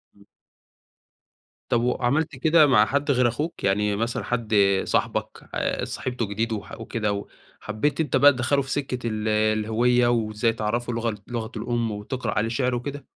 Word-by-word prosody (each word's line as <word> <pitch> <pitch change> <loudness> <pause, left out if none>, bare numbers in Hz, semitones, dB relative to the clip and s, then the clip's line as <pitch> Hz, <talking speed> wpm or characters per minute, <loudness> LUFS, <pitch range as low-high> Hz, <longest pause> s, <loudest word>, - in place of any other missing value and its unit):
إمم. 100 0 -21 1.4
طَب 120 -2 +2
وعملت 140 +5 0
كده 155 +3 +5
مع 115 -6 +5
حد 140 +6 0
غير 125 -2 +3
أخوك؟ 150 +8 -3
يعني 105 +1 +1
مثلًا 115 +3 -2
حد 115 -3 -1 0.3
صاحبك - - -2
اتصاحبتوا 125 -3 -2
جديد 110 +3 -2
وح 105 +1 -7
وكده، 110 -2 -2
و 100 0 -5 0.3
حبّيت 125 +8 -2
أنت 150 - -1
بقى 145 +2 +7
تدخّله 130 +2 +1
في 135 0 -7
سِكّة 125 -4 -2
ال 110 -1 -2
الهوية 110 +3 +2
وإزاي 115 -1 +1
تعرّفه 115 +2 -2
لغ 115 -1 -1
لغته 115 -2 -5
الأم 120 0 -1
وتقرأ 105 +5 -4
عليه 110 +2 +1
شِعر 125 +1 0
وكده؟ 140 +3 -5
120 Hz, 155 wpm, -24 LUFS, 110-130 Hz, 1.4 s, بقى